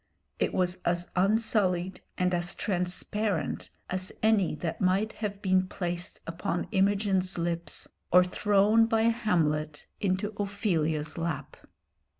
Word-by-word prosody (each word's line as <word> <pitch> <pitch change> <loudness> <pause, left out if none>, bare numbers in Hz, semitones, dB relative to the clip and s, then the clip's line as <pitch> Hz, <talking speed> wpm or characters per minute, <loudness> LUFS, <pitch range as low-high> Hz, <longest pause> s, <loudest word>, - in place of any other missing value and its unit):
It - - +1
was 180 -1 0
as 175 0 -2
unsullied 190 -2 +1 0.2
and 180 0 +1
as 175 0 0
transparent 185 0 -1 0.2
as 185 0 -3
any 215 -7 +3
that 160 +2 -4
might 195 +4 +2
have 205 -2 -5
been 185 -1 +2
placed 175 -1 -3
upon 175 +2 -3
Imogen's 195 -2 +2
lips 170 -2 -1 0.2
or 180 +1 +7
thrown 205 +4 +3
by 225 -1 +2
Hamlet 165 -10 0
into 200 +2 -1
Ophelia's 165 -7 -1
lap. 160 -5 -3
185 Hz, 120 wpm, -28 LUFS, 175-205 Hz, 0.2 s, or